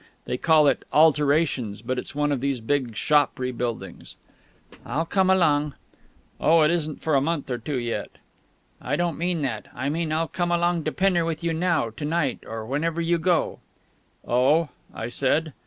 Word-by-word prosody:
They - - -2
call 155 -2 +5
it 140 - +2
'alterations,' 145 -7 +2
but 125 +2 -2
it's 125 - -8
one 145 0 +1
of 135 -4 -1
these 135 -2 -1
big 120 -1 -1
shop 145 +4 +2
rebuildings." 125 -2 -4 0.7
"I'll 150 +7 -2
come 190 +2 +1
along." 150 -6 +3 0.6
"Oh, 165 +1 +4
it 155 - +4
isn't 155 -3 -2
for 160 - 0
a 135 - +4
month 150 -2 -2
or 120 - -2
two 140 +4 -3
yet." 120 -1 -3 0.7
"I - - -1
don't 175 -2 0
mean 170 -2 -1
that. 120 -6 -3
I 130 +3 -2
mean 160 +1 -2
I'll 160 +1 0
come 175 0 -2
along 175 -1 +1
to 155 - 0
Pinner 185 -2 +2
with 165 0 -3
you 165 -1 0
now, 160 -8 0
to 115 - -9
night, 150 -3 0
or 110 0 -5
whenever 160 +7 -1
you 170 0 +1
go." 175 +1 +1 0.7
"Oh!" 135 +6 +3 0.2
I 110 - -5
said. 140 +5 0
150 Hz, 180 wpm, -24 LUFS, 130-165 Hz, 0.7 s, call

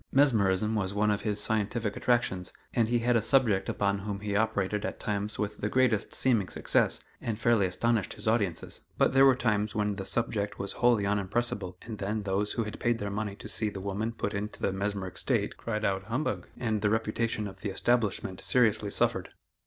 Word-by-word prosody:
Mesmerism 110 -7 +4
was 100 -2 -1
one 105 +1 +3
of 105 - -1
his 105 -1 -1
scientific 110 0 -1
attractions, 105 -7 0 0.2
and 115 -2 +2
he 120 +1 +2
had 120 +1 +2
a 115 - +4
subject 115 -4 +2
upon 100 -1 0
whom 100 0 -4
he 105 -1 -2
operated 105 -1 0
at - - -4
times 105 0 -2
with 105 -1 -2
the 105 - -2
greatest 125 -3 +1
seeming 115 -7 +2
success, - - +1 0.2
and 110 -2 -2
fairly 115 -4 +3
astonished 110 +2 0
his - - -7
audiences. 105 -7 0 0.2
But - - +3
there 135 0 +7
were 135 - +6
times 105 -3 0
when 105 -2 0
the 95 - -4
subject 110 -3 -1
was 100 - -3
wholly 120 -4 +3
unimpressible 100 -1 -1
and 110 -3 -7
then 105 +2 -2
those 100 +1 0
who 115 - 0
had 105 -1 -7
paid 120 -1 +1
their 100 -2 -4
money 100 -1 -3
to - - -9
see 110 - 0
the 100 - -7
woman 100 +4 -2
put 110 -2 -3
into 105 +1 -4
the 95 - 0
mesmeric 95 -2 -2
state - - 0
cried 110 -2 -3
out 95 -1 0
"humbug," 125 +8 -2
and 110 -4 -1
the 105 - +2
reputation 110 0 0
of 95 0 -11
the 105 - -2
establishment 105 -2 0
seriously 110 -4 +3
suffered. - - +1
105 Hz, 200 wpm, -29 LUFS, 100-115 Hz, 0.2 s, there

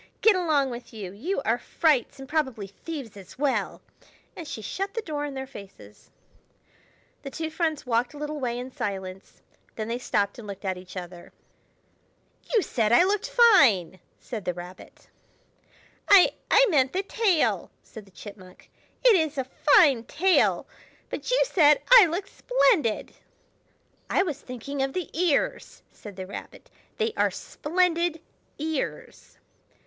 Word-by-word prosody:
Get 440 -2 +6
along 305 -7 +1
with 240 -1 -9
you! 195 -4 -6
You 275 - -3
are 230 +2 +1
frights, 295 -2 +1
and 270 - -9
probably 265 -9 -1
thieves 235 - -8
as 195 +2 -13
well." 275 -1 -1 0.5
And 330 - -8
she 220 - -7
shut 390 - -4
the 455 - -1
door 295 -2 -3
in 285 -2 -6
their 265 0 -4
faces. 195 - -14 1.1
The 275 - -7
two 320 +3 -5
friends 320 -3 -2
walked 245 +3 0
a - - -9
little 300 0 -5
way 240 -3 -2
in 250 +1 -6
silence; 190 -4 -6 0.3
then 215 -1 -4
they 235 +1 -2
stopped 205 -3 -1
and 220 - -10
looked 200 0 -8
at 190 -1 -1
each 185 +1 -11
other. 175 -1 -9 1.2
"You 450 -5 +3
said 220 -2 0
I 240 - +6
looked 400 +2 0
fine!" 260 - +5 0.2
said 220 -5 -7
the 180 - -2
Rabbit. 180 +1 -12 1.0
"I—I 400 +5 +5
meant 265 -4 +2
the 380 +2 -1
tail!" 395 -5 +1
said 220 -3 -12
the - - -20
Chipmunk. 185 -2 -13 0.3
"It 475 -4 +8
is 315 -4 0
a 265 - 0
fine 265 - +4
tail. 370 +8 +2 0.5
But - - -5
you - - +3
said 300 - +4
I 470 -7 +10
looked 355 +5 -4
splendid!" 445 - +1 1.0
"I - - +2
was 300 -6 -5
thinking 265 +3 -6
of 270 0 -1
the 365 -2 -4
ears!" 335 -3 -1
said 205 -3 -12
the 185 0 -6
Rabbit. 195 - -10 0.3
"They 445 -1 -1
are - - +2
splendid 340 0 -1 0.4
ears." 310 -1 -5
275 Hz, 155 wpm, -26 LUFS, 215-340 Hz, 1.2 s, I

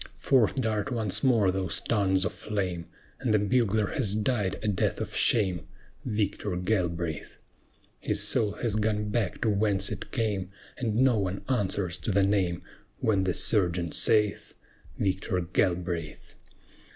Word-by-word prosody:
Forth 125 -5 +3
dart 110 -4 -1
once 110 -5 0
more 115 -8 +4
those 95 -3 -1
tongues 95 -3 +1
of 105 - -2
flame, 90 -5 -3 0.3
And 125 -4 -1
the 105 - +5
bugler 110 0 +1
has 105 -5 -1
died 105 -3 0
a - - -1
death 100 -3 0
of - - -5
shame, 95 -8 +2 0.4
Victor 105 -3 -2
Galbraith! 85 -4 -2 0.6
His - - -1
soul 105 -2 +2
has 110 0 -2
gone 105 -1 0
back 105 -4 -2
to 115 - +2
whence 100 -1 +1
it - - -6
came, 105 -6 -1 0.3
And 110 -4 -2
no 125 -2 +3
one 95 0 -3
answers 100 -7 -1
to 95 - -2
the 100 0 +3
name 95 -4 0 0.3
When 100 -4 +1
the 90 - +1
Sergeant 90 -5 +2
saith, 105 -2 +1 0.4
"Victor 95 -1 -1
Galbraith!" 85 -2 -2
100 Hz, 145 wpm, -28 LUFS, 90-110 Hz, 0.6 s, the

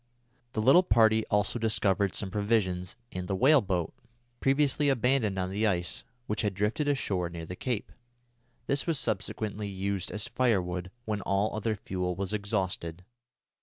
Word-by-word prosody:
The 110 - -1
little 135 +9 +7
party 110 -9 +4
also 105 +3 +1
discovered 100 -4 +1
some 95 -2 -1
provisions 95 -4 0 0.2
and 90 -1 -5
the 95 - -1
whale 135 +7 +5
boat, 90 -5 -2 0.5
previously 145 +1 +2
abandoned 125 -5 +2
on 95 0 -1
the 105 +3 +1
ice, 90 -3 -2 0.2
which 105 - -1
had 105 -3 -1
drifted 110 - 0
ashore 100 -11 0
near 85 -1 -7
the 90 - -7
cape. 120 +1 -3 0.7
This 140 +4 0
was 165 -3 +1
subsequently 105 -2 -2
used 100 -1 -2
as 105 0 -2
firewood 95 -7 0 0.2
when 105 -2 -2
all 100 +3 0
other 110 0 -1
fuel 90 -3 -3
was 95 +2 -3
exhausted. 95 -5 -2
105 Hz, 155 wpm, -29 LUFS, 95-115 Hz, 0.7 s, little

